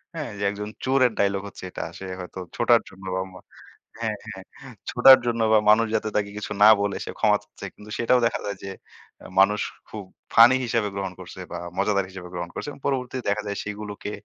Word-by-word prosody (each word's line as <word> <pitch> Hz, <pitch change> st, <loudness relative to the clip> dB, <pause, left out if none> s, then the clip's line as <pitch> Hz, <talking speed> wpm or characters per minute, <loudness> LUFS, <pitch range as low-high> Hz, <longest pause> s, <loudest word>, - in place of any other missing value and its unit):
হ্যাঁ, 150 Hz, -8 st, -4 dB
যে 100 Hz, -, -3 dB
একজন 105 Hz, +1 st, -6 dB, 0.2 s
চোরের 130 Hz, -2 st, +3 dB
dialogue 100 Hz, 0 st, +1 dB
হচ্ছে -, -, -12 dB
এটা। -, -, -5 dB, 0.2 s
সে 95 Hz, -, -7 dB
হয়তো 90 Hz, +1 st, -8 dB, 0.2 s
ছোটার 120 Hz, -1 st, +4 dB
জন্য 95 Hz, 0 st, -14 dB
বা 95 Hz, -, 0 dB
ম -, -, -17 dB, 0.7 s
হ্যাঁ, 110 Hz, -2 st, -1 dB
হ্যাঁ 95 Hz, -3 st, -8 dB, 0.5 s
ছোটার 130 Hz, +2 st, +8 dB
জন্য 115 Hz, -1 st, 0 dB
বা 110 Hz, -, +7 dB
মানুষ 115 Hz, +2 st, +6 dB
যাতে 110 Hz, 0 st, -1 dB
তাকে 105 Hz, -1 st, 0 dB
কিছু 105 Hz, -, -6 dB
না 105 Hz, -, +10 dB
বলে 100 Hz, -1 st, -1 dB
সে -, -, -7 dB
ক্ষমা -, -, +4 dB
চাচ্ছে। -, -, -11 dB
কিন্তু 105 Hz, 0 st, -14 dB
সেটাও 125 Hz, +2 st, +3 dB
দেখা 120 Hz, -, -3 dB
যায় 100 Hz, -, -4 dB
যে 95 Hz, -, -5 dB, 0.5 s
এ -, -, -13 dB
মানুষ 105 Hz, +2 st, +4 dB, 0.3 s
খুব 105 Hz, -2 st, -7 dB, 0.3 s
ফানি 115 Hz, +3 st, +8 dB
হিসাবে 115 Hz, -3 st, 0 dB
গ্রহণ 95 Hz, -2 st, -3 dB
করছে -, -, -10 dB
বা -, -, -4 dB, 0.2 s
মজাদার 100 Hz, 0 st, +1 dB
হিসেবে 95 Hz, -2 st, -9 dB
গ্রহণ 85 Hz, -1 st, -4 dB
করছে -, -, -5 dB
এবং 135 Hz, -, -14 dB
পরবর্তীতে 130 Hz, -2 st, -2 dB
দেখা 105 Hz, +1 st, 0 dB
যায় 100 Hz, -, -3 dB
সেগুলোকে 105 Hz, 0 st, -6 dB
105 Hz, 205 wpm, -24 LUFS, 100-115 Hz, 0.7 s, না